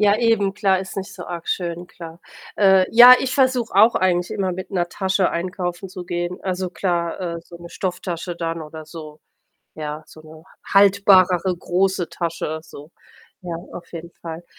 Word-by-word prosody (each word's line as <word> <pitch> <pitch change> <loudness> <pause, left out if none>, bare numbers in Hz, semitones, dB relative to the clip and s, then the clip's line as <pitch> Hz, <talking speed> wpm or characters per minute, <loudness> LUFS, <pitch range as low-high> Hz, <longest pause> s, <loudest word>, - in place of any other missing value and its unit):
Ja, 205 -1 +4
eben, 220 -4 +1
klar, 195 -3 +2
ist 190 0 -7
nicht 195 0 -5
so 180 - -9
arg 170 -1 -7
schön, 175 -1 -3
klar. 165 0 -11 0.4
Äh, 190 -2 +5
ja, 245 +2 +10
ich 260 -1 -2
versuche 255 -5 +1
auch 215 +4 +5
eigentlich 180 -1 +1
immer 190 -2 -2
mit 185 +1 -7
'ner 175 -3 -1
Tasche 190 0 0
einkaufen 180 +1 -4
zu 185 -1 -8
gehen. 175 0 -4
Also, 185 -1 -3
klar, 175 -2 -2
äh, 170 -2 -4
so 170 +1 -14
'ne 170 0 -11
Stofftasche 180 -1 -4
dann, 165 -1 -4
oder 155 +1 -9
so. 155 -1 -10 0.6
Ja, 150 0 -6
so 155 - -15
'ne 155 0 -15 0.2
h - - -7
haltbarere, 190 -2 +4
große 185 0 0
Tasche, 165 -2 -4
so. 150 0 -13 0.5
Ja, 175 -2 -6 0.2
auf 175 - -10
jeden 170 0 -8
Fall. 165 0 -8
180 Hz, 175 wpm, -21 LUFS, 170-195 Hz, 0.6 s, ja